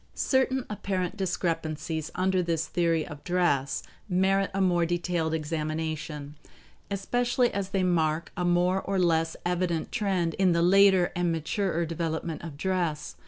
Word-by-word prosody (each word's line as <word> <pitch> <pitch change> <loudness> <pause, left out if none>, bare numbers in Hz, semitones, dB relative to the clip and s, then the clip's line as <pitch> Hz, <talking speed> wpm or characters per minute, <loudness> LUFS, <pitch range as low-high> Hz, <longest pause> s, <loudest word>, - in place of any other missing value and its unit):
Certain 260 -1 +1
apparent 190 -3 -2
discrepancies 160 -4 -2
under 185 0 +2
this 165 -2 -1
theory 165 -2 +1
of 145 -1 -10
dress 175 -6 +1 0.3
merit 195 +2 +2
a 195 - -2
more 180 -3 +3
detailed 170 -1 -1
examination, 155 -1 -3 0.6
especially 245 +5 +1
as 195 -1 -2
they 195 -1 0
mark 165 -2 +1
a 180 - -2
more 175 +2 +2
or 195 0 -2
less 165 -2 +2
evident 175 -2 -1
trend 190 -7 0
in 185 -2 +4
the 170 0 +2
later 190 0 +5
and 175 -1 +1
maturer 170 +2 -1
development 165 0 -3
of 160 -4 -8
dress. 175 -3 -1
175 Hz, 140 wpm, -27 LUFS, 160-190 Hz, 0.6 s, later